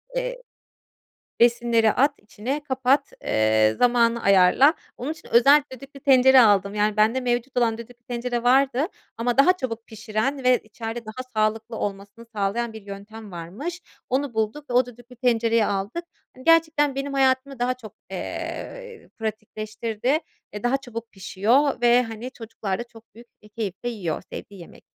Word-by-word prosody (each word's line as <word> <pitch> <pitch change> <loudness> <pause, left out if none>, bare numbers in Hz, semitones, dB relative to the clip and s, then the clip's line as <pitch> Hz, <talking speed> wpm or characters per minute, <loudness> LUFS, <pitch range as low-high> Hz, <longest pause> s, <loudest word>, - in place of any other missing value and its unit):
eee, - - -3 1.0
besinleri 235 -2 +4
at 280 +3 +3
içine, 245 +8 -5
kapat, 265 0 +1
eee, 110 0 +3
zamanı 235 -1 +3
ayarla. 200 - +5 0.2
Onun 270 +6 -3
için 320 - -14
özel 275 +5 +7
düdüklü 275 +2 -11
tencere 265 -1 +6
aldım. 200 -3 +4
Yani, 210 0 +1
bende 220 +4 +3
mevcut 245 +1 -2
olan 230 -2 +2
düdüklü 240 +1 -12
tencere 240 0 -3
vardı 265 +3 +3 0.3
ama 240 +2 -1
daha 365 +7 +6
çabuk 230 -7 -5
pişiren 220 +5 -3
ve 250 -1 +5
içeride 225 +2 -7
daha 220 +4 -6
sağlıklı 220 +1 0
olmasını 205 +3 -6
sağlayan 215 +3 -1
bir 220 -1 -10
yöntem 200 +1 -10
varmış. 210 - -6 0.3
Onu 265 -1 -1
bulduk 220 +7 -2
ve - - -3
o 250 0 +4
düdüklü 245 +1 -14
tencereyi 230 -2 +2
aldık. 205 - -2 0.3
Hani, 255 - -14
gerçekten 315 -4 +4
benim 275 +1 -3
hayatımı 270 0 +1
daha 245 +1 0
çok, 235 -4 -12 0.2
eee, 485 -2 -6
pratikleştirdi. 220 +4 -2 0.3
Eee, 210 0 -7
daha 245 +2 +2
çabuk 230 -4 -8
pişiyor 220 +9 +1
ve, 240 +1 +5
hani, 225 +1 -7
çocuklar 220 -5 -5
da 240 - -4
çok 230 -1 -19
büyük 235 +2 -14 0.2
bir 210 - -16
keyifle 210 +1 -5
yiyor, 185 -10 -3
sevdiği 200 -2 -9
yemek 170 - -14
235 Hz, 155 wpm, -24 LUFS, 215-260 Hz, 1.0 s, özel